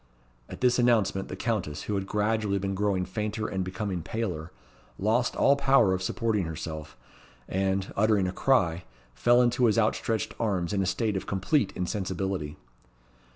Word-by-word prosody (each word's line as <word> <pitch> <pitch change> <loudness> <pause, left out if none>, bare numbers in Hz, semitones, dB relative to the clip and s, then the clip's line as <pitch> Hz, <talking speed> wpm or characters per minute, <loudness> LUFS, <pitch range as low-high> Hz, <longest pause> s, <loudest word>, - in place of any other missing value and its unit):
At - - -9
this 125 0 +3
announcement, 110 -5 +2
the - - -6
Countess, 90 -11 -2
who 105 - -3
had 95 -1 -2
gradually 105 -1 0
been 95 0 -2
growing 95 -2 0
fainter 105 +3 -3
and 95 -1 -2
becoming 95 0 -3
paler, 90 -5 -4 0.5
lost 115 +5 +1
all 140 - +4
power 135 -8 +4
of 95 - -2
supporting 105 0 0
herself, 80 -1 -6 0.5
and, 95 0 -1
uttering 105 -2 +3
a - - -2
cry, 90 -9 +2 0.3
fell 120 - +4
into 120 +1 +2
his 110 -1 +3
outstretched 110 0 0
arms 95 -5 -1
in 100 - +1
a 95 - 0
state 110 +1 0
of 95 - -4
complete 100 - +1
insensibility. 95 -4 -3
100 Hz, 155 wpm, -27 LUFS, 95-115 Hz, 0.5 s, all